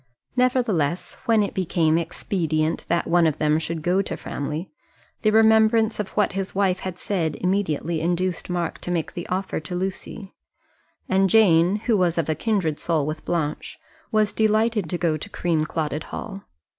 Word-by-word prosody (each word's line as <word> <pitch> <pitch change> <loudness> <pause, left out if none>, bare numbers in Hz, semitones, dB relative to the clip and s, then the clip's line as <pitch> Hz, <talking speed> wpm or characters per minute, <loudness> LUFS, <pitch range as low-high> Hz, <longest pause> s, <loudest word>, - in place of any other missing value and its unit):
Nevertheless, 230 - +1
when 225 -3 +4
it 200 - -3
became 165 -3 +1
expedient 165 -1 -1
that 170 0 +1
one 170 -1 +3
of 155 - -1
them 150 0 +2
should 160 -1 -4
go 180 +3 +2
to - - -5
Framley, 155 +5 -5 0.5
the 215 - +3
remembrance 220 0 +4
of 210 - -2
what 210 - +3
his 195 0 -4
wife 190 -2 +2
had 185 -2 -5
said 170 -6 -1
immediately 170 -3 -1
induced 175 +2 -1
Mark 175 -2 -2
to - - -6
make 170 -3 -2
the 175 - -6
offer 190 +1 -2
to 160 +3 -6
Lucy; 190 +2 -5 0.7
and 190 0 +3
Jane, 180 -3 +5
who 235 - +3
was 180 -4 +1
of 165 - 0
a - - +3
kindred 165 -3 -1
soul 160 -4 0
with 155 +1 -5
Blanche, 160 -4 -2 0.3
was 215 -2 +2
delighted 220 -3 +1
to 175 - -1
go 165 -3 0
to 180 - -8
Creamclotted 155 -3 -1
Hall. 200 -2 -7
180 Hz, 170 wpm, -23 LUFS, 160-205 Hz, 0.7 s, Jane